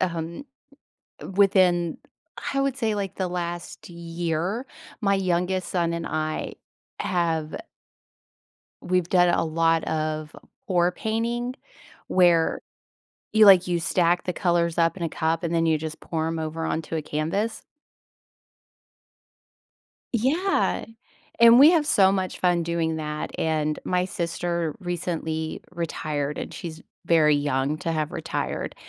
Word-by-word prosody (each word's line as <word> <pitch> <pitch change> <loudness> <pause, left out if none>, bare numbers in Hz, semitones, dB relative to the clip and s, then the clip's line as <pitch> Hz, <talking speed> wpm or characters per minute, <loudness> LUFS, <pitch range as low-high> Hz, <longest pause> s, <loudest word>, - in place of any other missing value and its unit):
um, 170 - -3 0.9
within 185 -4 +3 0.6
I 275 - +2
would 275 -1 0
say, 225 -5 0
like, 200 -2 -4
the 190 - -1
last 175 0 -5
year, 170 +6 -3 0.4
my 200 -3 +2
youngest 185 0 0
son 170 -2 0
and 170 0 -3
I 155 0 -3 0.5
have 165 -4 -1 1.3
we've 180 -1 0
done 180 -1 +4
a 170 -1 +2
lot 165 0 +2
of 155 -1 -3 0.3
pour 175 -2 +2
painting, 235 +5 -2 0.5
where 175 -3 +3 0.7
you 220 -1 +6
like 190 -3 +8
you 175 -1 0
stack 175 +1 +1
the 180 - -1
colors 170 -2 0
up 165 0 +2
in 180 - -6
a 165 - 0
cup, 160 +2 -1
and 170 -1 -2
then 165 0 +2
you 160 -1 +2
just 155 0 -6
pour 160 -1 -2
'em 165 0 -2
over 160 +1 -3
onto 160 0 -2
a 155 - -2
canvas. 165 +10 -2 2.5
Yeah. 300 - +1 0.5
And 235 0 +8
we 290 +4 +9
have 325 -4 +2
so 195 -9 +5
much 190 -1 -2
fun 175 -2 +2
doing 165 -1 -1
that, 150 -1 -4
and 155 -1 0
my 180 0 0
sister 170 -2 -2
recently 165 -3 -3
retired, 155 -4 -3
and - - -5
she's 165 -2 -7 0.2
very 155 -3 +4
young 145 0 0
to 165 - -2
have 155 -1 -1
retired, - - -3
170 Hz, 135 wpm, -25 LUFS, 160-185 Hz, 2.5 s, we